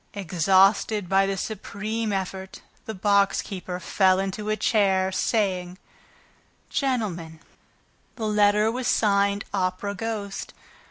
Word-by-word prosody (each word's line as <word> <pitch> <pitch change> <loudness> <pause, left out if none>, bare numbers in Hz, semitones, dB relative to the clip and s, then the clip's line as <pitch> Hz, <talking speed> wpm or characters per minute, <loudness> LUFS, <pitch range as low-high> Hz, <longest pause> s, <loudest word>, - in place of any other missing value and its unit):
Exhausted 195 +2 +2
by 195 +1 +3
this 195 -1 -2
supreme 215 +1 -4
effort, 190 0 -4 0.3
the 220 - -4
box 200 0 +2
keeper 180 -2 -6
fell 185 +1 +2
into 195 +2 -3
a 215 - 0
chair, 190 -4 +2
saying: 185 -3 -1 0.9
"Gentlemen, 190 - -2 0.8
the 225 - -4
letter 210 +1 +3
was 250 +1 -3
signed, 200 -1 +2
'Opera 190 +1 -1
Ghost.' 205 -1 -5
200 Hz, 110 wpm, -25 LUFS, 190-215 Hz, 0.9 s, by